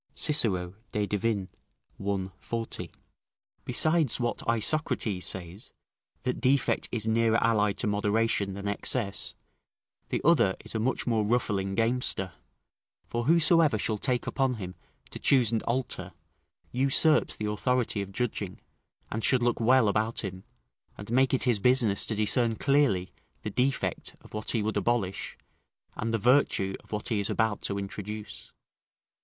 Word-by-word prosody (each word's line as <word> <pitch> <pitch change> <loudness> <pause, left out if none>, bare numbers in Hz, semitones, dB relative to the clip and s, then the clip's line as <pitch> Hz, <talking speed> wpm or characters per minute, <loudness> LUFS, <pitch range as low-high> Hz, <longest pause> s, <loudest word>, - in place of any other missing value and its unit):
Cicero, 100 - +1 0.2
De 105 -1 0
Divin., 105 -1 -1 0.6
i. 100 -2 -1
40.] 115 -1 -4 0.8
besides 155 -6 +2
what 120 -1 -1
Isocrates 115 - 0
says, 95 +4 -5 0.5
that 125 - -2
defect 135 +1 +2
is 110 -3 -2
nearer 115 0 +3
allied 105 -3 +2
to - - 0
moderation 105 -1 +1
than 100 0 -5
excess: 100 +1 -1 0.7
the - - 0
other 120 - +4
is - - -4
a 110 - -1
much 125 +4 0
more 115 -3 +1
ruffling 105 -4 0
gamester; 115 -5 0 0.8
for 120 0 -2
whosoever 165 - +4
shall 105 +1 -1
take 125 0 0
upon 135 -2 0
him 90 -4 -6 0.4
to - - -7
choose 125 -5 +3
and 115 - 0
alter, 115 -7 -2 0.6
usurps 135 +4 +3
the 105 - -4
authority 115 +1 0
of 100 0 -6
judging, 100 -3 -3 0.5
and 110 0 -3
should 130 -2 +3
look 120 0 +1
well 125 0 +4
about 110 +3 0
him, 95 -2 -6 0.5
and 100 +2 -8
make 130 +2 +3
it 130 - +2
his 120 -5 +2
business 120 -3 +3
to 110 - -2
discern 115 +2 +2
clearly 135 -10 +2 0.3
the 105 - -3
defect 130 +5 -1
of - - -17
what 105 0 -3
he 115 -3 +2
would 110 +1 -1
abolish, 115 -6 -1 0.6
and 115 +1 -2
the 115 - +1
virtue 115 -5 +2
of - - -22
what 105 +2 -3
he 110 -3 +1
is 100 - 0
about 110 -3 0
to 100 - -2
introduce. 105 +2 -7
110 Hz, 150 wpm, -28 LUFS, 100-125 Hz, 0.8 s, other